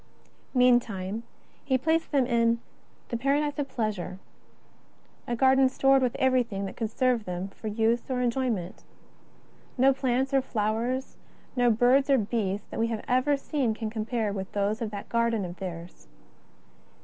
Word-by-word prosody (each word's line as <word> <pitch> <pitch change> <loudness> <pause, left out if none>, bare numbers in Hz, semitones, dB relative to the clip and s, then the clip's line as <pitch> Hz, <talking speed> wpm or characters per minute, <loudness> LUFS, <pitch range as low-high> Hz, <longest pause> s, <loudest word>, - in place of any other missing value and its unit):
Meantime 230 -5 +2 0.4
He 265 -2 +2
placed 320 +5 0
them 275 -4 +3
in 235 -1 +2 0.2
" - - -34
the 235 - -2
paradise 285 +4 0
of 280 -1 -2
pleasure," 210 -7 -3 1.1
a 240 - -1
garden 265 +1 +4
stored 270 +1 +3
with 250 -2 0
everything 245 -7 +1
that 190 - -7
could 225 -2 -2
serve 245 -1 +1
them 180 +2 -4
for 215 - -9
use 225 +3 0
or 255 -1 -1
enjoyment. 240 -7 -1 1.0
Xo 270 +1 +5
plants 265 0 0
or 270 - +4
flowers, 235 +3 -2 0.4
no 245 -1 +3
birds 250 +5 +4
or 275 - +5
beasts 205 -3 -1
that - - -5
we 230 - +2
have 225 -2 -4
ever 255 +3 +2
seen 275 -5 -1
can 220 -1 -4
compare 220 -1 -2
with 190 -1 -5
those 205 +2 0
of 225 - -2
that 205 -1 -7
garden 235 -3 +1
of 175 0 -8
theirs. 170 - -8
235 Hz, 160 wpm, -27 LUFS, 210-260 Hz, 1.1 s, Xo